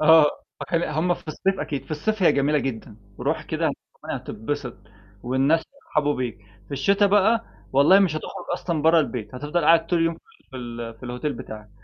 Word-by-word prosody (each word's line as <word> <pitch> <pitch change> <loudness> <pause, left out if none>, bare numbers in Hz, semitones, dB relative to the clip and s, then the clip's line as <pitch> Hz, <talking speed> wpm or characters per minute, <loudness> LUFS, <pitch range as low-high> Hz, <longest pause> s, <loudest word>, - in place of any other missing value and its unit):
آه، 160 0 +7 0.3
فكان 170 -1 -1
ال - - -1
هُم 160 +4 +1
في 165 - -15
الصيف 190 +5 -1
أكيد، 140 -3 -3
في - - -21
الصيف 205 +7 -1
هي 175 - +6
جميلة 145 +2 +2
جدًا. 115 -5 -5 0.2
رُوح - - -1
كده - - -1 0.3
رومانيا - - -4
هتتبسط، 125 +2 -4 0.5
والناس 135 +6 +2
بيرحبوا 150 - -1
بيك. 125 -3 -3 0.3
في - - -11
الشتاء 200 +9 +3
بقى 210 +3 +3 0.3
والله 140 +8 +6
مش 175 -6 +2
هتخرج 155 - -6
أصلًا 165 -4 -2
برا 160 +1 +6
البيت، 120 -5 -4
هتفضل 150 +5 -1
قاعد 165 +1 +5
طول 170 -1 +2
يوم 165 0 +1 0.4
في 130 - -8
ال 120 -2 -6
في 125 - -8
الhotel 125 +4 -3
بتاعك. 105 -4 -9
150 Hz, 190 wpm, -24 LUFS, 130-170 Hz, 0.5 s, آه